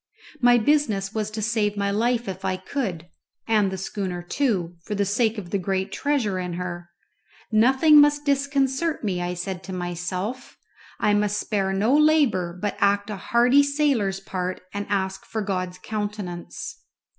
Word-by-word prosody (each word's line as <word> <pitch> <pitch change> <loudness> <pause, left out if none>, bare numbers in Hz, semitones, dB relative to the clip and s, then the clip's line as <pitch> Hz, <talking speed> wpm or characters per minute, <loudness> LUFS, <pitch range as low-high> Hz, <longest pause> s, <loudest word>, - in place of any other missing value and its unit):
My 245 -2 +6
business 220 -6 +1
was 215 -1 -2
to 215 0 -4
save 210 -2 0
my 200 0 0
life 235 +3 0
if 190 0 -5
I 190 -1 0
could, 185 - -4 0.4
and 215 -3 +3
the 190 - -4
schooner 185 -2 -4
too, 180 -6 -1
for 210 - -4
the 200 0 +1
sake 220 +3 +1
of 185 -4 -7
the 200 - +1
great 190 +1 -2
treasure 235 -10 0
in 180 -1 -4
her. 175 -1 -5 0.6
Nothing 265 +7 +6
must 290 0 +3
disconcert 280 +2 0
me 185 -4 -1
I 175 0 -2
said 180 +1 -4
to 190 - -6
myself 180 +7 -4 0.4
I 210 - +3
must 205 0 +1
spare 195 -3 -1
no 210 +8 +2
labour, 280 - +3
but 205 +1 -2
act 200 +1 +2
a - - -3
hearty 240 +7 +4
sailor's 280 -9 +1
part 185 -1 -4
and 205 0 -4
ask 190 -1 -1
for 220 -1 -4
God's 185 -2 -3
countenance. 205 -5 -5
205 Hz, 165 wpm, -24 LUFS, 185-240 Hz, 0.6 s, My